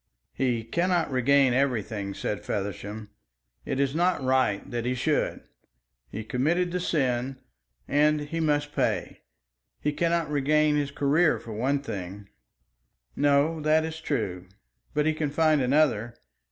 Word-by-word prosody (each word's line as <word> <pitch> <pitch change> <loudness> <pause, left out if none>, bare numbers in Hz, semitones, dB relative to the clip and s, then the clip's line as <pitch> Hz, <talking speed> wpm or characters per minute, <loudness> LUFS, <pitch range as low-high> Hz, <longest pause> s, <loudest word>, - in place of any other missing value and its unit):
"He 120 -4 0
cannot 170 +5 0
regain 130 0 +4
everything," 110 -7 -1
said 105 - -3
Feversham. 105 +1 -5 0.5
"It 135 - -2
is 140 -1 +1
not 175 -2 +1
right 130 -6 +1
that 120 -1 -2
he 125 +1 -1
should. 145 +4 0 0.7
He 110 - -6
committed 160 +10 0
the 180 - -1
sin, 130 -6 -1 0.5
and 150 +1 +3
he 150 +3 -4
must 145 -2 0
pay. - - -1 0.6
He 150 - -1
cannot 170 -1 0
regain 150 +1 +2
his 145 -1 0
career 145 +4 +2
for 115 - -9
one 135 +6 0
thing." 100 -3 -7 0.9
"No, 145 +3 +2
that 155 +1 +3
is 160 0 -6
true; 100 - -3 0.5
but 150 0 +2
he 155 - +2
can 155 -1 -2
find 155 0 +3
another. 125 -4 +2
140 Hz, 140 wpm, -27 LUFS, 120-155 Hz, 0.9 s, regain